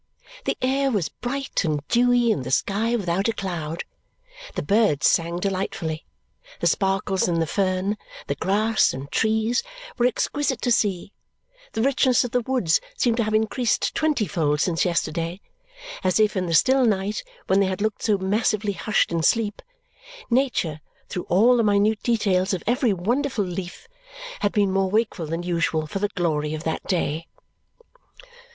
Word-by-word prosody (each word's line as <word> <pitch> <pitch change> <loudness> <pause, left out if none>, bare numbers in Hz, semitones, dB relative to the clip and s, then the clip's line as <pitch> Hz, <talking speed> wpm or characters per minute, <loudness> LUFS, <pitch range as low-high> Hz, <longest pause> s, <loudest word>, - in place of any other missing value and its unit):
The - - -1
air 270 +1 +2
was 200 - 0
bright 275 0 -3
and 150 -3 -2
dewy 245 -1 +3
and 140 -11 -1
the 130 - -5
sky 210 - +1
without 195 -2 0
a 230 - +1
cloud. 170 -5 -4 0.7
The - - -2
birds 205 -8 +2
sang 170 +1 +2
delightfully; 180 -4 -3 0.5
the - - -2
sparkles 195 -1 +1
in 170 -2 0
the 165 - +1
fern, 190 +3 0 0.3
the - - -1
grass, 210 - +2
and 140 +2 -8
trees, 220 +2 +1 0.4
were 240 - +5
exquisite 265 +1 -1
to 245 - +1
see; 200 -4 0 0.6
the 225 - 0
richness 260 -2 +3
of 245 - -4
the 250 - +1
woods 235 -10 +1 0.2
seemed 235 -2 +2
to 235 - +2
have 215 0 0
increased 220 +1 +1
twenty 300 -8 +1
fold 150 -3 0
since 165 +2 +1
yesterday, 170 0 -1 0.6
as 185 +2 +2
if, 215 -1 +3
in 185 -2 -1
the 165 - +1
still 260 +9 +4
night 205 -2 0 0.2
when 195 - +3
they 195 - +3
had 190 +1 -3
looked 215 0 -1
so 210 -2 +2
massively 205 +1 0
hushed 210 +2 0
in 170 -1 0
sleep, 210 +4 +1 0.7
Nature, 235 - +1 0.3
through 180 - -5
all 230 +8 +5
the 230 - +3
minute 210 +1 +2
details 195 -5 +1
of 180 - -7
every 245 +1 +2
wonderful 225 +4 0
leaf, 180 - -6 0.5
had 205 - +1
been 200 -2 +2
more 195 0 +1
wakeful 210 -5 0
than 165 +3 -3
usual 170 -3 0
for 175 +6 -4
the 205 +1 0
glory 155 -4 0
of 155 - -7
that 160 - -2
day. 165 -3 -1
200 Hz, 165 wpm, -24 LUFS, 175-230 Hz, 0.7 s, were